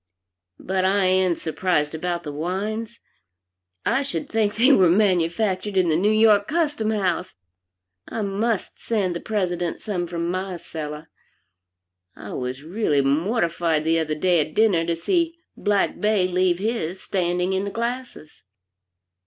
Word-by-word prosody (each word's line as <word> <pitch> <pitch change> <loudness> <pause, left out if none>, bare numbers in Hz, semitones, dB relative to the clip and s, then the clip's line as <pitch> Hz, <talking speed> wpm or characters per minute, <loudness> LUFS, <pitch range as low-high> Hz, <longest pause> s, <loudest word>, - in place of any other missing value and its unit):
But 190 0 -1
I 195 +1 +3
am 185 -1 +3
surprised 160 -2 -1
about 175 +1 -3
the 150 - -5
wines. 210 +9 -3 0.9
I 235 +5 +2
should 280 +1 -4
think 215 -2 +1
they 245 +6 +5
were 190 -10 +6
manufactured 190 +1 +1
in 180 -2 +3
the 155 - +3
New 190 +6 +2
York 215 -1 +4
Custom 295 -9 0
House. 185 -5 -1 0.7
I 220 - -3
must 205 +1 -2
send 200 -6 0
the - - -2
President 180 -5 -2
some 180 -5 -3
from 170 0 -3
my 185 0 -3
cellar. 155 -1 -7 1.0
I 100 - -9
was 130 +2 -4
really 165 -4 +1
mortified 165 - +1
the 165 +1 +2
other 155 -1 -1
day 175 +2 +2
at 155 0 -2
dinner 195 -7 +3
to 170 - +1
see 335 - 0 0.2
Blacque 205 -1 0
Bey 210 -3 +2
leave 180 -1 +2
his 195 -4 -2
standing 180 0 -1
in 190 +1 0
the 200 - -3
glasses." 235 -7 -5
185 Hz, 145 wpm, -23 LUFS, 170-215 Hz, 1.0 s, were